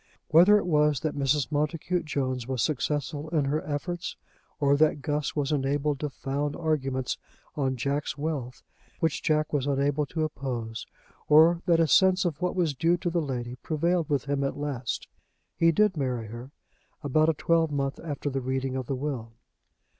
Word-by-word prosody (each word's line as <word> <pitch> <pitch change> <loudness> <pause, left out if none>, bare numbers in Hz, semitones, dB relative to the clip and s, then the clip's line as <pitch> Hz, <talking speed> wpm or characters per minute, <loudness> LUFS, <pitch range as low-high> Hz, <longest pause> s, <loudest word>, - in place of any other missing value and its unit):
Whether 180 +7 +7
it 205 - -1
was 150 -4 +2
that 155 -2 -1
Mrs. 140 +1 +1
Montacute 160 +3 -1
Jones 130 -5 -2
was 130 -3 -1
successful 150 +2 -2
in 155 -4 +1
her 145 +3 0
efforts, 170 +4 -4 0.4
or 140 -1 +4
that 150 -2 +2
Guss 150 +1 -1
was 145 -1 0
enabled 145 0 0
to 150 - -2
found 140 +2 -3
arguments 135 -6 -1 0.4
on 135 -3 0
Jack's 140 +5 -2
wealth 145 -5 -4 0.4
which 160 -3 0
Jack 155 0 +1
was 145 -2 0
unable 140 +1 +1
to 160 +1 -2
oppose, 120 -7 -4 0.4
or 165 +3 +6
that 170 -2 +4
a 165 - +5
sense 190 +6 +4
of 165 -2 -2
what 180 0 0
was 170 -5 +1
due 165 +6 +2
to 175 -1 -2
the 170 0 +1
lady 125 -4 -4
prevailed 165 +3 0
with 145 -1 0
him 140 0 -1
at 135 - -2
last, 140 -5 -3 0.5
he 165 0 +4
did 210 +2 +3
marry 125 -6 -2
her 120 +3 -8 0.5
about 155 +3 +3
a 160 - +1
twelvemonth 145 -4 +1
after 145 -2 -3
the 135 0 -2
reading 130 +1 -2
of 130 -2 -3
the 135 - -1
will. 125 -5 -4
145 Hz, 175 wpm, -27 LUFS, 135-160 Hz, 0.5 s, Whether